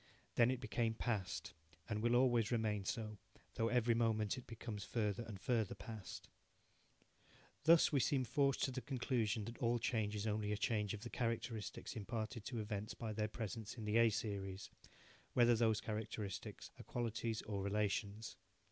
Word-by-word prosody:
Then 120 0 +5
it 130 -1 0
became 115 -3 0
past, 105 -6 -2 0.3
and 105 -1 -1
will 120 +1 +3
always 120 -3 +4
remain 110 -4 +1
so, 110 -1 -3 0.3
though 115 - +1
every 120 -1 +3
moment 110 -2 +2
it 130 - -9
becomes 115 -3 -5
further 105 0 0
and 110 -4 -7
further 110 -2 +1
past. 100 0 -7 1.4
Thus 165 0 +7
we 145 - +4
seem 130 0 +3
forced 140 +3 +2
to 135 - +2
the 130 0 -3
conclusion 120 -4 0
that 115 +1 -7
all 120 0 +2
change 110 -2 0
is 105 0 -2
only 105 -1 0
a 105 - +1
change 105 -2 +1
of 105 - -9
the 120 - -6
characteristics 115 -1 -2
imparted 110 0 -3
to 120 -3 -3
events 105 +1 -3
by 110 -2 -3
their 105 0 0
presence 110 0 -5
in 110 - -5
the 105 +2 +2
A 115 0 +7
series, 100 -3 -3 0.6
whether 120 -1 +6
those 110 -1 +3
characteristics 105 -3 -4
are - - -7
qualities 115 -1 -2
or 100 -2 -3
relations. 105 +1 -1
110 Hz, 165 wpm, -39 LUFS, 105-120 Hz, 1.4 s, Thus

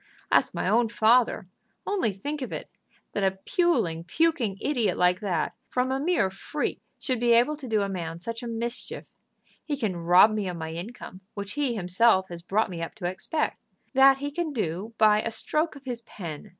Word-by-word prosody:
"Ask - - +3
my - - -1
own 230 +1 +3
father. 230 -1 +3 0.4
Only 380 - 0
think 285 +10 -5
of 255 - -4
it, - - -6 0.4
that 205 - -2
a 190 0 +1
puling, 185 - +1
puking 245 - +1
idiot 245 -6 0
like 180 0 +3
that, 185 -7 -1 0.2
from 255 +1 0
a 265 - 0
mere 290 - +1
freak, 195 - -3 0.2
should 255 -4 -2
be 240 0 +4
able 245 +6 +4
to 275 -3 -8
do 215 -3 +1
a - - -1
man 170 -4 -4
such 230 +6 -5
a 240 - -5
mischief! 235 +1 -5 0.5
He 290 -2 -3
can 215 -8 -1
rob 175 +5 +6
me 210 -3 -1
of 180 -1 -4
my 160 -1 -5
income, 185 +1 -8
which 200 -1 -4
he 280 -5 0
himself 190 +1 +3
has 170 -1 -7
brought 200 +4 0
me 170 -2 -5
up 165 - -5
to 200 -5 -7
expect. 190 - -2 0.3
That 270 0 +7
he 285 +1 -4
can 320 0 -2
do 210 - -3
by 215 -1 +5
a 230 - -2
stroke 305 +7 -1
of 280 -1 -13
his 245 -2 -4
pen. 175 -4 -8
220 Hz, 200 wpm, -27 LUFS, 185-260 Hz, 0.5 s, That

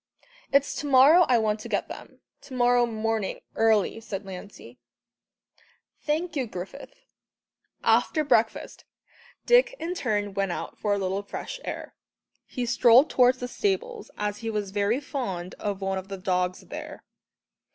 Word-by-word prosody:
"It's 280 0 +3
to 295 - -4
morrow 285 +6 +7
I 245 - +4
want 215 -1 0
to - - -8
get - - -1
them - - -11 0.2
to 260 - -10
morrow 245 -1 +3
morning 220 -2 -2
early," 220 -1 +2
said 200 -3 -6
Lancey. 190 +1 -10 1.2
"Thank 320 +3 -2
you, 265 -4 -1
Griffith." 190 - -8 0.9
After 310 - +3
breakfast, 225 -6 0 0.6
Dick - - +4
in 340 -3 -3
turn 205 - -1
went 195 -2 -1
out - - -6
for 205 -1 0
a - - -2
little 190 0 -1
fresh 350 - -7
air - - -6 0.5
he 250 - -3
strolled 240 +3 +5
towards 250 0 +4
the 245 - -5
stables, 430 - -2
as 210 0 -2
he 225 - -4
was 210 -3 -3
very 205 +5 +1
fond 195 -11 -5
of 205 -1 -3
one 195 0 -1
of 190 - -10
the 195 -1 -6
dogs 180 -1 -1
there. - - -9
225 Hz, 150 wpm, -26 LUFS, 200-275 Hz, 1.2 s, morrow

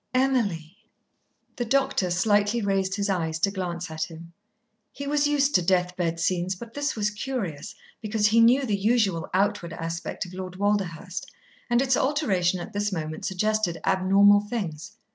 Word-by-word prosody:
Emily!" 205 -11 0 0.8
The 240 - -1
doctor 265 -6 +1
slightly 205 +5 +2
raised 195 -2 0
his 200 0 -1
eyes 165 -5 -1
to 195 - +2
glance 180 -3 -4
at 160 0 -2
him. 165 0 -12 0.6
He 280 - -7
was 290 +1 +2
used 290 -1 +2
to 180 - +4
death 180 0 +1
bed 165 -2 -1
scenes, 180 +2 0
but 230 +4 -10
this 290 +1 -2
was 210 -1 0
curious, 210 - -4 0.3
because 215 -1 0
he 225 +2 +4
knew 250 +4 +5
the 210 -5 0
usual 200 -5 +1
outward 195 -3 0
aspect 165 +3 -4
of 180 - -11
Lord 185 -1 -6
Walderhurst, 195 -2 -2 0.4
and 240 +2 +3
its 260 -1 +2
alteration 200 - +1
at 175 - -8
this 205 +1 -1
moment 155 -3 -4
suggested 205 -2 0
abnormal 195 +2 +5
things. 205 -4 -5
195 Hz, 160 wpm, -25 LUFS, 175-225 Hz, 0.8 s, knew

